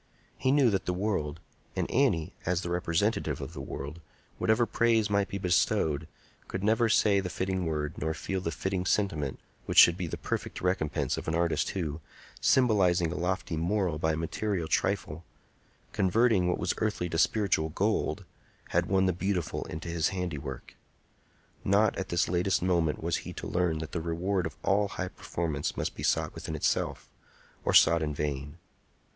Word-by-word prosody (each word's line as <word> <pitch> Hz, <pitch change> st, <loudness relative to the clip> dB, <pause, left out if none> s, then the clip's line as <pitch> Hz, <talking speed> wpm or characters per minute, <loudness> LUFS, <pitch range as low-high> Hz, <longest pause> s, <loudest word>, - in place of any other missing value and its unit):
He 130 Hz, -, +1 dB
knew 135 Hz, -4 st, +4 dB
that 95 Hz, -1 st, -1 dB
the 90 Hz, -, 0 dB
world, 90 Hz, -8 st, -1 dB, 0.4 s
and -, -, 0 dB
Annie 110 Hz, -, +2 dB
as 90 Hz, 0 st, 0 dB
the 85 Hz, -, -3 dB
representative 90 Hz, +5 st, 0 dB
of -, -, -6 dB
the -, -, -6 dB
world, 75 Hz, +5 st, -6 dB, 0.4 s
whatever 110 Hz, +2 st, +3 dB
praise 115 Hz, -3 st, +2 dB
might 100 Hz, -1 st, +2 dB
be 100 Hz, -, -4 dB
bestowed, 80 Hz, -4 st, +1 dB, 0.4 s
could 95 Hz, -, -4 dB
never 110 Hz, +2 st, +3 dB
say 105 Hz, -2 st, +4 dB
the 95 Hz, -2 st, -3 dB
fitting 95 Hz, 0 st, -2 dB
word 75 Hz, -1 st, -2 dB
nor 80 Hz, +1 st, -1 dB
feel 95 Hz, +3 st, -3 dB
the 85 Hz, -, -2 dB
fitting 95 Hz, +3 st, -2 dB
sentiment 80 Hz, -10 st, 0 dB, 0.3 s
which -, -, -3 dB
should 85 Hz, 0 st, +9 dB
be 90 Hz, -3 st, -3 dB
the -, -, -4 dB
perfect -, -, -4 dB
recompense 90 Hz, -4 st, 0 dB
of -, -, -6 dB
an 80 Hz, -, 0 dB
artist 85 Hz, -1 st, +1 dB
who, 80 Hz, -5 st, -3 dB, 0.4 s
symbolizing 95 Hz, -9 st, +3 dB
a -, -, -4 dB
lofty 90 Hz, 0 st, -2 dB
moral 85 Hz, -1 st, 0 dB
by 80 Hz, 0 st, +1 dB
a -, -, -2 dB
material 85 Hz, +1 st, -2 dB
trifle,—converting 100 Hz, +4 st, -1 dB
what 90 Hz, -, +1 dB
was 90 Hz, -, 0 dB
earthly 105 Hz, -5 st, -1 dB
to 80 Hz, -1 st, -2 dB
spiritual 100 Hz, -7 st, +2 dB
gold,—had -, -, -2 dB
won 95 Hz, -1 st, +3 dB
the 95 Hz, -, +2 dB
beautiful 90 Hz, -2 st, -2 dB
into 80 Hz, +2 st, -7 dB
his 85 Hz, -1 st, +1 dB
handiwork. 75 Hz, -9 st, -5 dB, 0.9 s
Not 100 Hz, +2 st, +3 dB
at 95 Hz, -, -4 dB
this 85 Hz, -, +1 dB
latest 90 Hz, +1 st, +1 dB
moment 85 Hz, -4 st, +1 dB
was 85 Hz, 0 st, +1 dB
he -, -, -7 dB
to -, -, -7 dB
learn 90 Hz, -3 st, 0 dB
that 80 Hz, -1 st, -6 dB
the 85 Hz, -, -2 dB
reward 90 Hz, +3 st, -1 dB
of -, -, -11 dB
all 100 Hz, +1 st, +2 dB
high 90 Hz, -2 st, -4 dB
performance 80 Hz, -6 st, -3 dB
must -, -, -2 dB
be -, -, -9 dB
sought -, -, +1 dB
within 80 Hz, -, -5 dB
itself, 75 Hz, -, -1 dB, 0.6 s
or -, -, +1 dB
sought 85 Hz, 0 st, +6 dB
in 75 Hz, -1 st, -2 dB
vain. 75 Hz, +1 st, -3 dB
90 Hz, 175 wpm, -29 LUFS, 80-100 Hz, 0.9 s, should